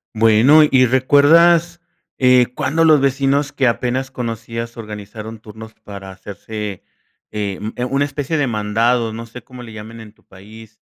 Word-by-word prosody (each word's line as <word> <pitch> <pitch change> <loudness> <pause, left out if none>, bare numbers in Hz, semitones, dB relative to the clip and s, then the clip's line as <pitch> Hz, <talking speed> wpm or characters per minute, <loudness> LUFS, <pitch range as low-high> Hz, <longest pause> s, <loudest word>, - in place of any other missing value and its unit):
Bueno, 115 +8 +5
y 130 -1 +4
recuerdas, 165 +7 +3 0.4
eh, 125 -1 +4
cuándo 165 +4 0
los 155 -3 +5
vecinos 140 +1 0
que 130 -3 0
apenas 125 +4 -2
conocías, 115 -1 -6
organizaron 110 0 -9
turnos 110 +1 -13
para 100 -3 -11
hacerse, 100 +1 -8 0.5
eh, 100 -3 -4
mm, 110 +1 -5 0.2
una 140 +1 +2
especie 145 +2 -4
de 145 - 0
mandado. 115 +1 0
No 115 +1 -7
sé 115 0 -12
cómo 125 -1 -12
le 115 -2 -11
llamen 110 +1 -10
en 105 -2 -13
tu - - -32
país. 110 +3 -16
115 Hz, 155 wpm, -18 LUFS, 110-135 Hz, 0.5 s, Bueno